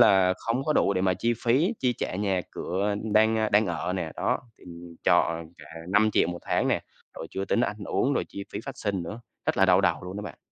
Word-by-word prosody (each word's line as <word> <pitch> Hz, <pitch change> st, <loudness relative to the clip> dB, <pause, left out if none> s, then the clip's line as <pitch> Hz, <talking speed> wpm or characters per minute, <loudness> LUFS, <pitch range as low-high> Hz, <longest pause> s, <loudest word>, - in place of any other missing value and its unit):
là 95 Hz, -2 st, +6 dB
không 120 Hz, +4 st, -1 dB
có 155 Hz, -, +1 dB
đủ 100 Hz, -, +2 dB
để 95 Hz, -, +1 dB
mà 95 Hz, -1 st, +2 dB
chi 120 Hz, +5 st, 0 dB
phí, 145 Hz, -, +3 dB
chi 125 Hz, -1 st, +2 dB
trả -, -, -2 dB
nhà 95 Hz, -2 st, 0 dB
cửa 100 Hz, +3 st, -1 dB, 0.2 s
đang, 110 Hz, +1 st, +4 dB
ờ, 110 Hz, -1 st, +1 dB
đang 105 Hz, +1 st, +4 dB
ở 90 Hz, 0 st, -2 dB
nè, 85 Hz, -4 st, -3 dB
đó, -, -, 0 dB, 0.2 s
thì -, -, -18 dB, 0.4 s
trọ 85 Hz, -, +3 dB, 0.2 s
cả -, -, -12 dB, 0.2 s
5.000.000 105 Hz, -2 st, +3 dB
1 85 Hz, -, -4 dB
tháng -, -, 0 dB
nè, -, -, +2 dB, 0.4 s
rồi -, -, -6 dB
chưa 95 Hz, -, -3 dB
tính 115 Hz, -, +1 dB
ăn 105 Hz, -3 st, 0 dB
uống, 140 Hz, -, +1 dB
rồi -, -, 0 dB
chi 100 Hz, -, -7 dB
phí 100 Hz, -, -3 dB
phát 135 Hz, -, -6 dB
sinh 100 Hz, -4 st, -2 dB
nữa, 105 Hz, +7 st, -7 dB, 0.3 s
rất -, -, +1 dB
là 95 Hz, -, +5 dB
đau 90 Hz, 0 st, +5 dB
đầu -, -, +2 dB
luôn 90 Hz, +2 st, -7 dB
đó 105 Hz, -, -4 dB
bạn. 105 Hz, -, -8 dB
100 Hz, 245 wpm, -27 LUFS, 95-110 Hz, 0.4 s, là